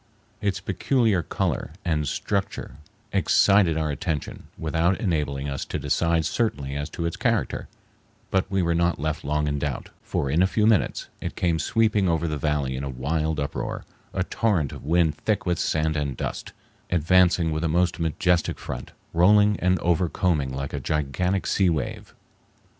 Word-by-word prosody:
Its 100 -2 0
peculiar 105 +1 +1
color 80 -3 -2
and 75 -4 0
structure 100 -2 -3 0.4
excited 100 -5 +4
our 80 -1 0
attention 80 -1 -4
without 80 +3 +1
enabling 75 -7 -1
us 70 -1 -3
to - - -4
decide 80 +3 +1
certainly 70 - -1
as 75 +2 -3
to 85 - -4
its 85 - -2
character, - - 0 0.6
but 95 0 +1
we 95 -2 +1
were 85 0 +1
not 85 +1 +1
left 75 +1 -2
long 75 +1 0
in 70 0 -1
doubt, 70 -1 -4
for 70 - -2
in 80 +5 +3
a 95 - +5
few 105 +2 +1
minutes 110 -3 +2
it - - -4
came 85 -3 +1
sweeping 105 -3 +2
over 85 0 +1
the 75 - -2
valley 75 -4 0
in 65 - -4
a 70 - -3
wild 75 +4 -1
uproar, 70 - -3 0.3
a 95 - -1
torrent 95 - 0
of - - -9
wind 80 0 +2
thick 105 -2 -1
with 90 -2 0
sand 80 0 0
and 70 -4 -2
dust, - - -4 0.4
advancing 90 0 +3
with 80 +1 -2
a 80 - +1
most 90 +2 +1
majestic 85 +1 +1
front, 65 - -7 0.2
rolling 105 +4 +5
and 90 +1 +2
overcombing 85 -4 +1
like 70 +1 -4
a - - -2
gigantic 90 +6 -1
sea 95 -3 +2
wave. 75 -6 -3
85 Hz, 170 wpm, -25 LUFS, 75-95 Hz, 0.6 s, a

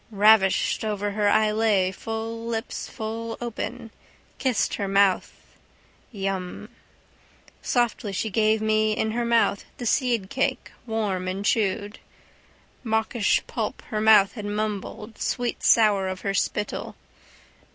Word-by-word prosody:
Ravished 210 -2 +4
over 205 -1 -2
her 205 0 +1
I 215 0 +3
lay, 210 -4 +2
full 225 +3 -5
lips 225 -1 -4
full 225 +1 -5
open, 240 0 -5 0.5
kissed 260 -3 +1
her 200 - -2
mouth. 195 -1 +3 0.8
Yum. 195 -4 -4 0.9
Softly 240 -3 0
she 205 +3 -2
gave 215 +1 +2
me 215 0 +2
in 220 0 -1
my 240 - 0
mouth 235 -3 +2
the 245 - -6
seedcake 250 +1 0 0.2
warm 205 -5 -1
and 195 +2 -3
chewed. 210 -3 0 0.8
Mawkish 220 -1 +1
pulp - - -4
her 215 -1 -1
mouth 215 -3 +6
had 210 -4 -7
mumbled 210 +1 -4
sweetsour 215 -4 +2
of 185 - -7
her 195 - -1
spittle. 210 +1 -2
215 Hz, 120 wpm, -25 LUFS, 200-225 Hz, 0.9 s, mouth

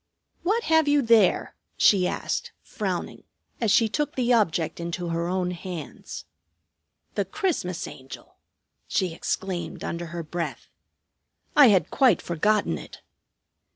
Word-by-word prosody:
"What 435 +6 +1
have 320 -4 +3
you 290 -1 +4
there?" 225 -5 +4 0.2
she 185 -3 +5
asked, - - -3
frowning, - - -4 0.4
as 225 - +2
she 230 +1 +5
took 295 +7 -2
the 250 -1 +2
object 175 -9 +1
into 170 +1 -4
her 170 0 -1
own 180 0 -1
hands. 175 -4 -7 0.9
"The 200 - 0
Christmas 190 - -2
Angel!" 130 0 -11 0.5
she 185 -3 0
exclaimed 180 +1 -3
under 170 0 -4
her 170 0 -5
breath. 170 +2 -5 0.9
"I 290 -3 +9
had 190 -8 +3
quite 260 -3 +4
forgotten 205 +5 +1
it." - - -12
185 Hz, 125 wpm, -25 LUFS, 170-235 Hz, 0.9 s, I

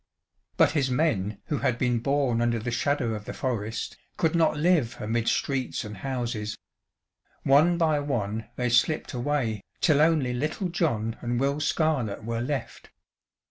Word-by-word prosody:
But - - +5
his 145 -4 +1
men 110 -8 0
who 150 - -2
had 120 - +1
been 120 -1 +1
born 135 -2 +1
under 120 0 +2
the 115 +2 -3
shadow 125 -1 0
of 105 -1 -6
the - - -5
forest, 115 -4 -3 0.2
could 160 -1 +2
not 160 -3 +3
live 155 -6 +2
amid 115 +2 -1
streets 135 -2 0
and 105 -1 -8
houses. 115 -3 -3 0.9
One 155 +6 +5
by 160 -3 +2
one 115 -6 -2
they 125 -1 0
slipped 125 +7 +2
away, 120 -5 -1 0.2
till 150 -4 +4
only 155 -6 +3
little 155 +9 -2
John 115 -11 -1
and 120 0 -1
Will 140 +2 +1
Scarlett 145 -9 0
were 115 +1 -2
left. 135 0 -4
125 Hz, 155 wpm, -27 LUFS, 115-150 Hz, 0.9 s, But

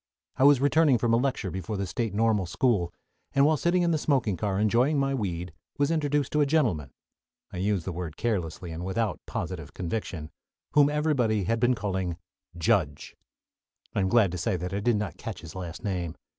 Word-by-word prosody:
I 130 - +4
was 145 -2 +7
returning 145 -1 +4
from 115 0 +1
a - - +5
lecture 125 -7 -1
before 95 +3 -4
the 100 - -1
State 110 +5 -2
Normal 105 -2 +1
School, 90 -4 +1 0.4
and 140 0 +5
while 155 +1 +4
sitting 175 +4 +2
in 170 - +2
the 160 - +1
smoking 130 -10 +1
car 100 +2 -1
enjoying 120 +8 +3
my 135 0 +1
weed 90 -8 -3 0.2
was 145 +2 +2
introduced 145 -3 0
to 150 - +2
a - - +4
gentleman 115 - +1 0.6
(I - - -5
use 95 -1 0
the 95 - -2
word 85 -2 -6
carelessly, 90 -6 -2
and 80 +2 -5
without 105 +4 -1
positive - - -5
conviction) 85 -3 -4 0.4
whom 145 -1 +5
everybody 140 -9 +1
had 115 +5 0
been 125 +1 +3
calling 95 -5 -2 0.4
"Judge." 80 -3 0 0.8
I - - 0
am 95 -1 +1
glad 105 -4 +4
to 90 - -4
say 90 - 0
that 90 +2 -5
I 100 - 0
did 115 +3 +2
not 105 0 -3
catch 115 -5 -6
his 85 - -10
last 90 0 -7
name. 90 -6 -2
105 Hz, 200 wpm, -27 LUFS, 90-135 Hz, 0.8 s, was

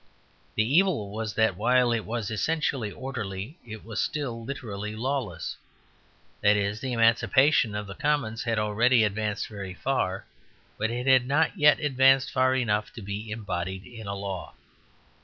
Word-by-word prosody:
The 110 - +3
evil 145 - +2
was 110 0 -4
that 110 -4 +2
while 125 +4 +3
it 115 -2 -1
was 115 -1 -3
essentially 135 -1 -1
orderly, 120 - -6
it 110 -2 -9
was 110 -1 -2
still 125 -6 -3
literally 105 -5 -5
lawless. 120 - -3 0.8
That 105 0 +5
is, 100 +1 -1
the 130 - -3
emancipation 115 +1 +3
of 105 0 -3
the 100 - -8
commons 140 -5 -1
had 115 -2 0
already 110 +3 +3
advanced 105 0 -1
very 100 -3 -7
far, 100 -7 -1 0.5
but 110 - 0
it 120 +2 -3
had 130 -2 +5
not 155 +4 +2
yet 150 +1 +5
advanced 135 -2 +4
far 130 0 +2
enough 105 -5 0
to 115 - -9
be 100 +3 -5
embodied 95 -3 -4
in 115 -4 -10
a 100 - -3
law. 100 -2 -6
115 Hz, 160 wpm, -27 LUFS, 105-130 Hz, 0.8 s, That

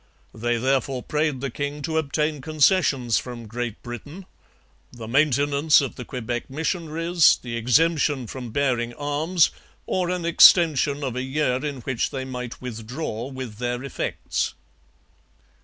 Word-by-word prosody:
They 120 +1 -1
therefore 130 0 0
prayed 150 -3 -1
the 135 -2 -3
king 145 +3 -4
to 160 +2 0
obtain 150 0 -1
concessions 150 - +2
from 120 -2 -8
Great 115 0 -5
Britain 145 - -8 0.7
the 115 -3 -9
maintenance 145 +3 +3
of 140 - -2
the 125 - -8
Quebec 120 -1 -4
missionaries, 165 +2 +2
the 120 -2 -5
exemption 145 +3 +2
from 125 +1 -7
bearing 120 -2 0
arms, 150 +4 +1 0.3
or 180 -2 -1
an 180 -2 -2
extension 155 -4 +5
of 130 -3 -3
a 125 - -2
year 130 -1 0
in 140 -4 -4
which 125 0 -1
they 130 -1 -4
might 125 -2 -6
withdraw 120 +1 -5
with 130 -5 -7
their 125 +1 -2
effects. 140 - -3
135 Hz, 140 wpm, -24 LUFS, 120-150 Hz, 0.7 s, extension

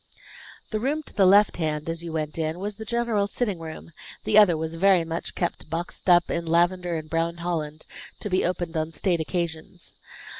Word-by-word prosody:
The 215 - 0
room 290 +7 -1
to - - -13
the 195 -2 +4
left 205 +2 +5
hand, 155 -2 -2
as 165 0 -2
you 170 - -5
went 155 0 -3
in, 160 +1 -1
was 200 +2 -4
the 220 - -7
general 235 -3 0
sitting 205 -4 -2
room; 160 +1 -8 0.3
the 215 - +1
other 200 -6 +7
was 160 +1 -3
very 180 0 +4
much 165 +1 -4
kept 175 -3 -3
boxed 170 +3 -3
up 175 -1 +5
in 170 -1 -2
lavender 175 +1 +2
and 155 -1 -6
brown 165 +1 -1
Holland, 160 -3 -3 0.3
to - - -4
be 185 -2 +1
opened 175 -1 -2
on 160 +1 -1
state 175 0 +1
occasions. 165 +1 -4
170 Hz, 195 wpm, -25 LUFS, 165-195 Hz, 0.3 s, other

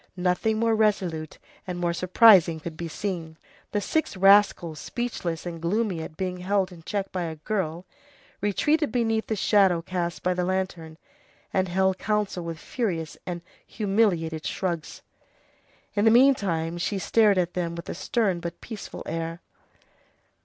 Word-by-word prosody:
Nothing 180 +5 +1
more 230 0 +2
resolute 185 -8 0 0.3
and 180 -1 -4
more 175 -1 0
surprising 185 -2 +6
could 160 +1 -7
be 170 +1 -5
seen. 165 -3 -4 0.3
The 205 - 0
six 315 -3 -1
rascals, 195 -5 +4
speechless 185 -10 -4
and 170 -2 -6
gloomy 190 0 0
at 155 -1 -8
being 185 -1 -2
held 190 +1 0
in 170 -2 -12
check 195 +4 -3
by 180 -2 -2
a 160 -1 -5
girl, 175 0 -3 0.6
retreated 295 - +1
beneath 225 -3 0
the 220 - -1
shadow 195 -4 +3
cast 175 -1 -3
by 180 - +2
the 180 0 -1
lantern, 180 -4 -3 0.6
and 185 0 +2
held 190 +1 +1
counsel 210 -4 -1
with 165 -1 -5
furious 165 - -3
and 175 -1 -4 0.2
humiliated 195 -7 0
shrugs. 170 -4 -3 0.9
In 205 +1 +1
the - - +7
meantime 200 -10 +3
she 200 +4 -1
stared 205 +2 +3
at 180 -1 0
them 170 -2 -2
with 170 - -8
a - - -3
stern 190 0 0
but 170 0 -6
peaceful 220 -3 -8
air. 165 +1 -4
185 Hz, 155 wpm, -26 LUFS, 170-210 Hz, 0.9 s, the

